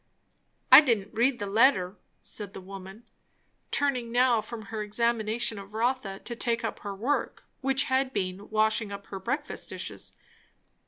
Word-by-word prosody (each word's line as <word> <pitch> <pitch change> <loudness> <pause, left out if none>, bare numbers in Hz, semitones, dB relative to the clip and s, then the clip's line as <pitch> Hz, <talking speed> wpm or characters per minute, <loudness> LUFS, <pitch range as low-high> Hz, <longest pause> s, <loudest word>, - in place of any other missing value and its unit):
"I 260 +3 +12
didn't 225 -8 0
read 240 +3 +2
the 205 - -4
letter," 200 -3 +3 0.3
said 205 -2 -7
the - - -6
woman, 195 +3 -10 0.7
turning 255 -5 0
now 245 -2 +4
from 220 +1 -8
her 215 - -2
examination 225 0 0
of 200 +2 -11
Rotha 230 -4 -1
to 235 - -6
take 230 -1 0
up 225 - -3
her 200 -1 -6
work, 250 +9 -2
which 270 0 +1
had 265 0 +1
been 185 -2 -3
washing 215 0 +1
up 200 0 -7
her 195 - -7
breakfast 290 +10 -4
dishes. - - -7
225 Hz, 155 wpm, -28 LUFS, 200-250 Hz, 0.7 s, I